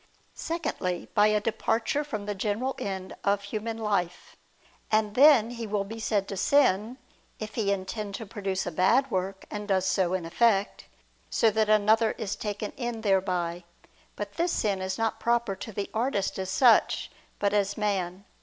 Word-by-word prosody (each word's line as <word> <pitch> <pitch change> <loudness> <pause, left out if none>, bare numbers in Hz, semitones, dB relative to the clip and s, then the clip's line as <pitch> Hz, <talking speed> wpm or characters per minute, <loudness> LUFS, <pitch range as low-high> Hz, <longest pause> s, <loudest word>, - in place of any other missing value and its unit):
Secondly, 300 - -3
by 210 -1 +5
a 215 0 +3
departure 225 +6 0
from 215 -8 -5
the 205 - -2
general 215 +6 -1
end 190 -1 -5
of 200 0 +1
human 220 +2 -4
life: 200 -6 -2 0.6
and 215 -1 +2
then 255 -3 +6
he 230 -2 -5
will 205 -1 0
be 225 +3 -8
said 205 -3 0
to 200 - -5
sin, 235 -1 +2 0.4
if 215 0 -7
he 210 -4 0
intend 200 +1 -3
to 225 - -6
produce 195 -2 -3
a 175 - -3
bad 210 - +3
work, 190 +1 -2
and 210 0 -5
does 190 -2 +1
so 185 -1 +1
in 180 -3 -3
effect, 200 +3 +1 0.4
so 225 - +3
that 215 0 +1
another 215 +1 +4
is 205 -3 -4
taken 205 0 -4
in 240 -3 -3
thereby. 180 -4 0 0.5
But 205 -1 -6
this 345 +1 +1
sin 200 -3 0
is 190 0 -3
not 225 -1 -1
proper 235 -4 +1
to 200 +3 -7
the 200 0 -4
artist 220 -5 -1
as 190 -1 -3
such, 235 +4 +3 0.3
but 200 0 0
as 200 -1 +1
man. 195 -2 -2
205 Hz, 175 wpm, -27 LUFS, 195-225 Hz, 0.6 s, then